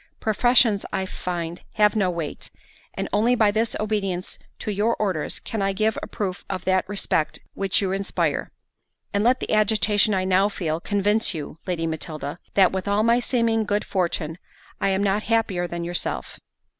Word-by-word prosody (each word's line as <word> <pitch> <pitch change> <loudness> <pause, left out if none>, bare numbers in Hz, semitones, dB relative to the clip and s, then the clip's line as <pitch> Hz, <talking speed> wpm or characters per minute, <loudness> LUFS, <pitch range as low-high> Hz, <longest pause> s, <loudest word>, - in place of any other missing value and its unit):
Professions, 225 -1 +4
I 190 0 -1
find, 175 -2 -4
have 210 0 +4
no 195 -4 +2
weight, 170 -4 -5 0.5
and - - -2
only 225 +4 +3
by 215 -3 +4
this 225 +2 0
obedience 195 -4 -2 0.2
to 215 - -3
your 210 +4 +1
orders, 190 -7 -1
can 220 -3 -4
I 195 0 +1
give 215 +2 +1
a - - -5
proof 190 -3 -4
of 185 -2 -4
that 185 0 +1
respect 165 -6 0 0.2
which 195 +1 +1
you 190 - 0
inspire;—and 200 +1 -3
let 250 +3 +4
the - - -2
agitation 215 -1 +3
I 185 - +1
now 190 +2 +3
feel, 165 -5 -2
convince 205 +1 +1
you, 155 +1 -6
Lady 170 -3 -1
Matilda, 160 -1 -4 0.2
that, 190 -2 +6
with 190 +1 -3
all 205 +1 +2
my 235 +1 +4
seeming 230 -3 +1
good 205 0 -1
fortune, 170 -3 -1 0.4
I - - +1
am 195 +1 +1
not 200 +1 +2
happier 215 -6 0
than 170 0 -4
yourself." 175 +1 -3
195 Hz, 170 wpm, -24 LUFS, 180-215 Hz, 0.5 s, that